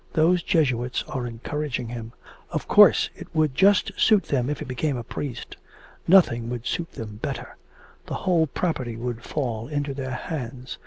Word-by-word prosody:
Those 170 +3 +4
Jesuits 130 -8 +1
are 125 -2 -3
encouraging 125 +1 -4
him. 115 -1 -7 0.4
Of - - -3
course - - +6
it - - -10
would 155 -3 +2
just 195 +6 +4
suit 215 -3 +5
them 130 -2 0
if 150 - -1
he - - -6
became 130 +2 -1
a 120 - -4
priest 125 +1 -6 0.5
nothing 120 -11 +5
would 120 -1 -5
suit 165 +6 -3
them 105 -2 -7
better; - - -5 0.5
the - - -3
whole 170 -4 +3
property 135 -7 -2
would 120 0 -4
fall 120 -5 -3
into 145 -1 -2
their 135 -1 -4
hands. 130 -5 -6
130 Hz, 165 wpm, -25 LUFS, 120-155 Hz, 0.5 s, course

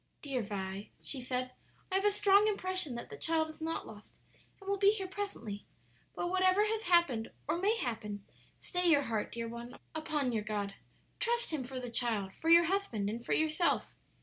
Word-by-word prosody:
"Dear 270 -4 -1
Vi," 200 -1 -4
she 270 - -3
said, 255 0 -2 0.4
"I - - +1
have 390 - 0
a - - +7
strong 410 0 +5
impression 370 - 0
that 235 - -6
the 435 - -8
child 320 -4 +1
is 315 - -14
not 325 +1 -2
lost, 210 -1 -13 0.4
and 390 - -14
will 400 0 0
be 400 0 +7
here 395 -3 -3
presently. 370 - -5 0.5
But 350 - -2
whatever 375 +2 +4
has 440 0 -1
happened, 340 -11 +3 0.2
or 310 - +1
may 420 +5 +3
happen, 215 - -4 0.3
stay 360 -1 0
your 290 -3 +5
heart, 225 -4 -2
dear 230 0 -3
one, 235 +1 -8 0.2
upon 305 -4 -1
your 220 -2 0
God; 205 -2 -2 0.5
trust 475 -2 0
Him 290 -4 -1
for 260 +1 -5
the 245 -1 -6
child, 220 -5 +1
for 325 - -2
your 340 +1 +9
husband, 320 - 0
and 235 +2 -5
for - - 0
yourself. 315 +2 +2
310 Hz, 195 wpm, -33 LUFS, 230-375 Hz, 0.5 s, your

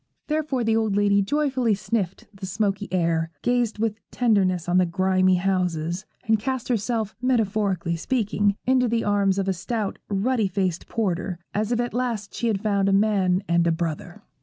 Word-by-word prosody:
Therefore 300 -5 -1
the 225 0 +2
old 220 -3 +1
lady 200 0 +3
joyfully 260 -1 +1
sniffed 195 -2 -3
the 195 -1 -7
smoky 205 +1 -1
air, 165 -2 +1
gazed 245 -3 +1
with 220 0 -1
tenderness 190 -8 +1
on 180 +1 +3
the 180 - +3
grimy 185 +1 +2
houses, 180 -2 -1 0.2
and 220 -3 +2
cast 260 +2 -3
herself, 225 -2 -1
metaphorically 205 -8 0
speaking, 205 0 0
into 255 -1 +3
the 230 0 0
arms 200 -2 +2
of 195 -1 -1
a 190 - +2
stout, 200 +4 -3
ruddy 215 +2 +1
faced 185 -3 -2
porter, 185 -4 -2 0.2
as 215 +2 -1
if 240 - +1
at 240 0 -1
last 235 -4 -2
she 235 - -2
had 205 -4 0
found 200 -2 +2
a - - +2
man 195 -2 +2
and 170 0 +2
a - - +3
brother. 170 +4 -4
205 Hz, 175 wpm, -24 LUFS, 185-225 Hz, 0.2 s, lady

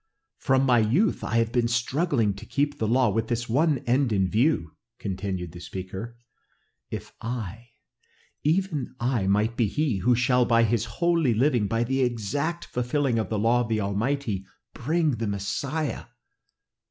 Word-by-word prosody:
"From 135 -1 +2
my 125 -3 +4
youth 130 - +2
have - - -4
I 115 +1 +4
been 120 +1 0
struggling 120 - +1
to 100 +3 -10
keep 145 +1 -1
the 110 - 0
law 120 0 +3
with 115 +2 -1
this 120 0 -2
one 145 +5 +2
end 125 +1 +2
in 95 -3 +2
view!" 110 - +1 0.3
continued 95 -3 -4
the 85 - -10
speaker. 95 +6 -7 0.7
"If - - -7
I, 115 0 -6 0.7
even 155 -5 0
I, 120 -5 0
might 105 +4 +2
be 115 -3 +2
he 140 0 0
who 120 +6 +3
shall 125 +1 +3
by 115 -1 +4
his 115 0 +1
holy 165 0 +1
living, 120 -3 +2
by 115 +2 0
the 135 +3 0
exact 130 - -1
fulfilling 125 0 0
of 110 - -2
the 110 - -1
law 115 +4 +3
of 120 - -3
the 110 -1 +1
Almighty, 105 +1 -1 0.3
bring 155 +4 +1
the 115 - -2
Messiah! 135 +10 -2
120 Hz, 165 wpm, -26 LUFS, 110-135 Hz, 0.7 s, my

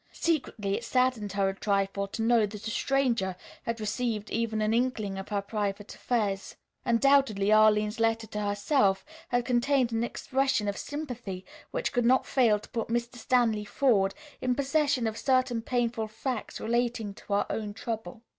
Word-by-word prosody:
Secretly 245 -11 -1
it 235 - -4
saddened 245 -4 +1
her 195 -1 +2
a 195 - 0
trifle 200 0 0
to 225 +3 -4
know 230 -2 +4
that 210 +1 -7
a - - -2
stranger 240 -9 +1 0.3
had 230 0 -3
received 215 0 -2
even 225 -1 -1
an 215 +1 +1
inkling 230 -5 0
of 195 - -8
her 200 -1 -1
private 205 -1 -3
affairs. 205 -5 -1 0.3
Undoubtedly 235 -4 +3
Arline's 215 0 +4
letter 225 0 +1
to 210 0 -5
herself 205 0 +1 0.2
had 245 -1 0
contained 250 0 +2
an 225 0 0
expression 260 -2 0
of 200 - -1
sympathy 245 -12 -6 0.2
which - - -2
could 245 - +2
not 255 +2 +4
fail 235 -6 +3
to 210 - -13
put 230 -2 -3
Mr. 240 +1 -2
Stanley 230 -3 +2
Forde 205 -4 +2 0.3
in 250 -1 +1
possession 280 -2 +1
of 220 0 -2
certain 255 -3 +2
painful 235 -2 -1
facts 225 +2 -4
relating 235 -2 -1
to 200 - -7
her 200 - +2
own 215 -2 -3
trouble. 225 +2 -6
225 Hz, 165 wpm, -28 LUFS, 205-245 Hz, 0.3 s, know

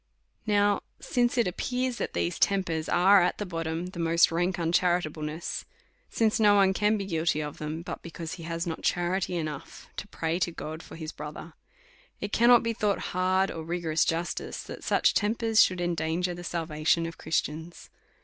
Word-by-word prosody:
Now 205 -1 +3 0.2
since 240 0 0
it 235 - +3
appears 250 +7 -2
that - - -3
these 85 0 -1
tempers 175 -5 +1
are 190 +2 +6
at 175 - +1
the 210 - -3
bottom 165 -1 -3
the 180 -1 -8
most 165 0 +4
rank 175 +2 0
uncharitableness, 165 -2 -1 0.5
since 220 -1 +1
no 205 -2 +6
one 195 -1 +5
can 210 +2 +2
be 200 - -3
guilty 165 -4 0
of 150 -1 -5
them, 155 +2 -4
but - - -6
because 165 0 -7
he 185 - -8
has 165 +1 -3
not 165 -2 -4
charity 180 +1 0
enough 155 -4 -6
to - - -5
pray 165 -2 -2
to 180 - +1
God 160 -1 -7
for - - -12
his 160 -1 -6
brother; 150 +2 -8 0.7
it 205 - -5
cannot 240 +1 +6
be 230 0 0
thought 210 -3 -1
hard 185 +1 +2
or 160 - -6
rigorous 165 -1 0
justice, 165 +1 -2
that - - -9
such - - +3
tempers 225 +1 +3
should 185 -1 +3
endanger 175 +1 -1
the 175 0 -8
salvation 165 -1 0
of 165 - -7
Christians. 160 +1 -3
175 Hz, 180 wpm, -28 LUFS, 160-195 Hz, 0.7 s, are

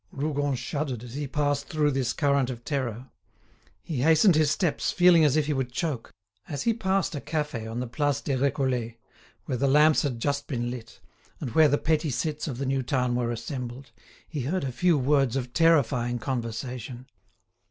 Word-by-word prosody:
Rougon 145 -1 -1
shuddered 130 -1 -3
as 120 -1 -9
he 145 +1 -3
passed 145 0 -1
through 150 -2 +1
this 130 -3 0
current 140 -3 +1
of 120 -2 -7
terror. 130 -3 -3 0.7
He 155 - -4
hastened 160 +6 +5
his 155 -1 +3
steps, 160 +1 0
feeling 175 -2 +6
as 150 -1 +3
if 155 - +2
he 150 - 0
would 130 -2 -2
choke. 135 -4 -3 0.4
As 145 - -4
he 230 - +2
passed 195 -5 0
a 145 - -4
cafe 150 -8 -3
on 115 +2 -4
the 125 - -2
Place 145 +3 0
des 140 -1 -2
Récollets, 130 -3 0 0.5
where 125 - -2
the 140 - +2
lamps 150 +3 +5
had 130 -5 -2
just 140 +3 -1
been 120 -3 -2
lit, 115 -2 -9 0.4
and 130 -6 -4
where 155 +5 +6
the 145 0 +2
petty 155 0 0
cits 150 +5 -2
of 130 -5 -4
the 140 - -3
new 135 0 0
town 125 -1 0
were 120 -1 0
assembled, 125 +2 -6 0.4
he 150 -4 -4
heard 160 +8 -1
a 135 - -2
few 170 +6 +2
words 135 -2 +2
of 125 -2 -3
terrifying 135 -7 +3
conversation. 125 +1 -5
140 Hz, 190 wpm, -26 LUFS, 125-150 Hz, 0.7 s, feeling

